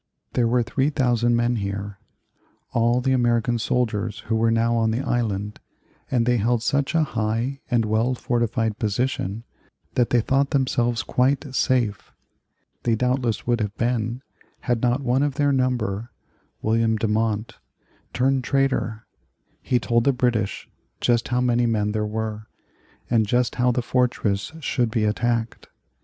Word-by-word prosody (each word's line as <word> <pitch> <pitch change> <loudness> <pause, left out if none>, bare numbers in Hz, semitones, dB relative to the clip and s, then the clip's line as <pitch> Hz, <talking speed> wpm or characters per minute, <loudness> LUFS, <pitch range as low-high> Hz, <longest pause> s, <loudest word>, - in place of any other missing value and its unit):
There 120 -2 +2
were 120 +1 +2
3,000 125 -3 +1
men 120 0 +1
here, 100 0 -4 0.7
all 120 +2 +2
the 135 +1 +1
American 120 -1 +2
soldiers 110 -2 -1
who 110 - -2
were 115 +1 +2
now 115 +1 +2
on 115 -1 +2
the 115 +4 -1
island, 105 -6 -2 0.5
and 120 -3 +1
they 120 0 +3
held 115 +1 +1
such 140 +5 0
a 160 - +4
high 115 +1 -2
and 120 -3 +2
well 110 +4 +1
fortified 115 -3 -1
position 110 -1 -1 0.5
that 120 -2 +2
they 120 - +3
thought 135 +4 +1
themselves 120 -5 +1
quite 135 +2 0
safe. 120 -7 0 0.7
They 115 -2 +1
doubtless 125 -1 0
would 120 0 +1
have 105 -1 -3
been 120 +1 -1 0.4
had 120 -2 0
not 125 +2 +1
one 130 +1 +2
of 145 -2 0
their 145 -1 +2
number, 120 -5 -1 0.5
William 110 0 +2
Demont, 110 0 -1 0.5
turned 130 +1 +1
traitor. 135 -6 0 0.6
He 125 - +1
told 120 0 +1
the 140 - +4
British 120 -5 -1 0.3
just 120 -1 +1
how 125 -1 0
many 120 -1 +2
men 105 -2 0
there 105 0 -1
were, 110 0 -4 0.6
and 110 -3 +2
just 120 +3 +1
how 125 0 +4
the 125 0 -1
fortress 120 -4 0
should 125 -4 0
be 110 0 0
attacked. 115 +1 -1
120 Hz, 150 wpm, -23 LUFS, 110-125 Hz, 0.7 s, a